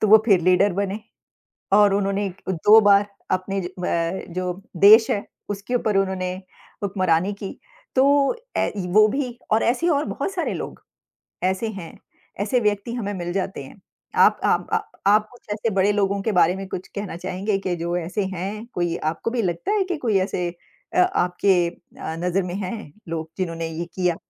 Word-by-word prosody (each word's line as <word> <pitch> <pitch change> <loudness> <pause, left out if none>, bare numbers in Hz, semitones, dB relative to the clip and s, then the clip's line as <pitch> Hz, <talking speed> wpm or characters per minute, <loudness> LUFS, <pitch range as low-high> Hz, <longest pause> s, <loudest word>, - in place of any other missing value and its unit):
तो 215 - +2
वो 220 +1 +8
फिर 195 -5 +5
लीडर 185 +3 +4
बने 200 +3 -2 0.7
और 205 -1 +6
उन्होंने 200 0 0 0.2
2 205 +6 +6
बार 205 0 +5 0.3
अपने 190 +1 -1
ज 175 - -4
व 180 - -2 0.5
जो 180 0 -1 0.2
देश 215 +5 +7
है, 205 - 0 0.3
उसके 205 +5 -4
ऊपर 220 -4 +1
उन्होंने 190 -2 -1 0.5
हुक्मरानी 185 -1 +1
की 200 -1 -8 0.4
तो 260 - +5 0.5
ए - - +1 0.2
वो 215 0 +8
भी 245 0 -3
और 220 - +4
ऐसे 260 +9 +1
और 295 -2 +2
बहुत - - -3
सारे 360 -3 -2
लोग - - -6 0.6
ऐसे 190 +4 0
हैं, 190 -6 -8 0.4
ऐसे 210 +5 +1
व्यक्ति 210 +2 0
हमें 205 -4 -3
मिल 175 -2 -4
जाते 190 -6 -3
हैं। 185 +8 -14 0.3
आप - - +5
आप - - +2 0.4
आप 210 +1 +4
कुछ 245 - -19
ऐसे 215 +2 -1
बड़े 195 +2 +3
लोगों 200 -1 +1
के 220 - 0
बारे 180 0 +4
में 195 0 -6
कुछ 180 - -5
कहना 200 -4 -4
चाहेंगे 195 +3 -2
कि 185 -2 -2
जो 170 +1 -2
ऐसे 180 +4 -2
हैं? 200 +5 -4
कोई 175 -1 -1
आपको 160 +8 -2
भी 245 -2 0
लगता 175 - -2
है 415 -2 +2
कि 365 -2 -2
कोई 225 -8 +1
ऐसे 185 -1 -1 0.5
अ, - - +4
आपके 180 - +2
अ, 170 -2 -9
नजर 180 +2 0
में 180 0 -4
हैं 195 -4 -5 0.2
लोग 160 -1 -4
जिन्होंने 165 -3 -2
ये 165 +1 -4
किया? 180 -2 +1
195 Hz, 180 wpm, -23 LUFS, 180-215 Hz, 0.7 s, वो